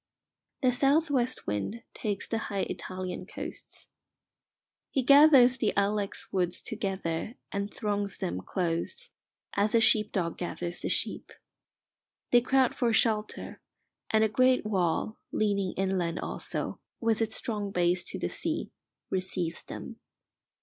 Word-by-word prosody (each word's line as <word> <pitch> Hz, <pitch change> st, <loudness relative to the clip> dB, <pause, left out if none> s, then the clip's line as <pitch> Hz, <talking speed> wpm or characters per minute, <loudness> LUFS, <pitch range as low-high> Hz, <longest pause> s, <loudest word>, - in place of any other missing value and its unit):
The 255 Hz, -, +5 dB
south 285 Hz, +5 st, +3 dB
west 255 Hz, -2 st, 0 dB
wind 105 Hz, -, -3 dB
takes 205 Hz, -3 st, -3 dB
the 225 Hz, -, -1 dB
high 200 Hz, -2 st, -1 dB
Italian 185 Hz, -1 st, -5 dB
coasts. -, -, -6 dB, 1.0 s
He 265 Hz, -, 0 dB
gathers 275 Hz, -2 st, +7 dB
the 215 Hz, -, +1 dB
ilex 200 Hz, 0 st, 0 dB
woods 180 Hz, -2 st, +2 dB
together 195 Hz, -1 st, -3 dB, 0.2 s
and 200 Hz, +1 st, -2 dB
throngs 205 Hz, -2 st, -1 dB
them 90 Hz, +2 st, -3 dB
close, 175 Hz, -, -2 dB, 0.4 s
as 205 Hz, +3 st, +2 dB
a -, -, +7 dB
sheep 220 Hz, -1 st, +4 dB
dog 170 Hz, -4 st, -2 dB
gathers 175 Hz, 0 st, -3 dB
the -, -, -2 dB
sheep. -, -, -1 dB, 1.0 s
They 245 Hz, -, +7 dB
crowd 260 Hz, 0 st, +3 dB
for 240 Hz, -2 st, +1 dB
shelter, 215 Hz, -1 st, 0 dB, 0.5 s
and 220 Hz, 0 st, +4 dB
a -, -, +5 dB
great 255 Hz, +2 st, +3 dB
wall, 190 Hz, +1 st, 0 dB
leaning 200 Hz, -3 st, 0 dB
inland 185 Hz, -3 st, 0 dB
also, -, -, -3 dB, 0.2 s
with 230 Hz, -1 st, +1 dB
its 220 Hz, -1 st, +2 dB
strong 210 Hz, -3 st, -3 dB
base 175 Hz, -1 st, +1 dB
to -, -, -5 dB
the -, -, -2 dB
sea, -, -, -2 dB, 0.4 s
receives 185 Hz, -3 st, -2 dB
them. -, -, -8 dB
205 Hz, 135 wpm, -29 LUFS, 185-235 Hz, 1.0 s, gathers